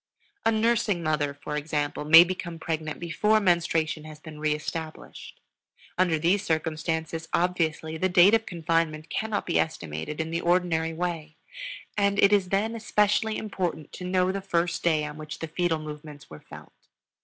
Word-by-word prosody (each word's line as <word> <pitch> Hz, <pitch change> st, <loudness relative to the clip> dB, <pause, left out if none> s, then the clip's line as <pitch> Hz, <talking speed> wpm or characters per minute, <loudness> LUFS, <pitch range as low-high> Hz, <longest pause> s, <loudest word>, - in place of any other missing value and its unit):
A -, -, +5 dB
nursing 220 Hz, -5 st, +1 dB
mother, 150 Hz, -2 st, 0 dB
for 145 Hz, +1 st, -6 dB
example, 150 Hz, -1 st, -2 dB
may 165 Hz, +3 st, +10 dB
become 175 Hz, -1 st, -5 dB
pregnant 160 Hz, -1 st, -4 dB
before 210 Hz, +6 st, +2 dB
menstruation 165 Hz, -4 st, +1 dB
has 155 Hz, -1 st, -10 dB
been 155 Hz, -1 st, -11 dB
reestablished. 155 Hz, +1 st, -5 dB, 0.6 s
Under 175 Hz, -3 st, +2 dB
these 175 Hz, +6 st, +2 dB
circumstances, 160 Hz, -1 st, -2 dB
obviously, 160 Hz, -3 st, 0 dB
the 185 Hz, +3 st, +1 dB
date 180 Hz, +3 st, +6 dB
of 225 Hz, 0 st, +2 dB
confinement 165 Hz, -2 st, -1 dB
cannot 220 Hz, -1 st, -2 dB
be 170 Hz, -, +1 dB
estimated 85 Hz, -, -3 dB
in 160 Hz, 0 st, -2 dB
the 165 Hz, +1 st, -1 dB
ordinary 170 Hz, -2 st, +1 dB
way, 165 Hz, -2 st, -4 dB, 0.6 s
and 200 Hz, -1 st, +1 dB
it 200 Hz, 0 st, +5 dB
is 195 Hz, -3 st, +2 dB
then 205 Hz, +4 st, 0 dB
especially 215 Hz, 0 st, +1 dB
important 180 Hz, -7 st, -4 dB
to -, -, -8 dB
know 185 Hz, 0 st, +1 dB
the 195 Hz, +1 st, -4 dB
first 175 Hz, -3 st, -1 dB
day 155 Hz, -3 st, +2 dB
on 150 Hz, 0 st, -7 dB
which 155 Hz, +1 st, -7 dB
the 165 Hz, -, -5 dB
fetal 165 Hz, +1 st, 0 dB
movements 150 Hz, -, -9 dB
were 75 Hz, -, -10 dB
felt. -, -, -13 dB
165 Hz, 160 wpm, -26 LUFS, 155-185 Hz, 0.6 s, may